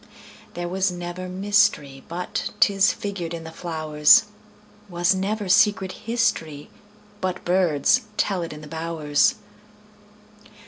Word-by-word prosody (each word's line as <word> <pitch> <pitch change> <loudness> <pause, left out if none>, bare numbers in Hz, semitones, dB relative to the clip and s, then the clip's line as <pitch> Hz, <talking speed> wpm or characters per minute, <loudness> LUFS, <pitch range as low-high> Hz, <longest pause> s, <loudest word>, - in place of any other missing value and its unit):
There 175 0 -4
was 190 +1 0
never 175 +1 -6
mysteryBut 180 -5 -1
'tis 195 0 +4
figured 180 -5 -5
in 165 - -8
the 160 - -9
flowers; 155 -2 +3 0.7
SWas 175 +1 +2
never 200 +2 -2
secret 190 +1 +3
historyBut 210 -1 -4
birds 175 -6 +2 0.2
tell 195 -3 0
it 165 - -5
in 150 0 -9
the 155 - -10
bowers. 160 -2 0
180 Hz, 105 wpm, -23 LUFS, 160-200 Hz, 0.7 s, tis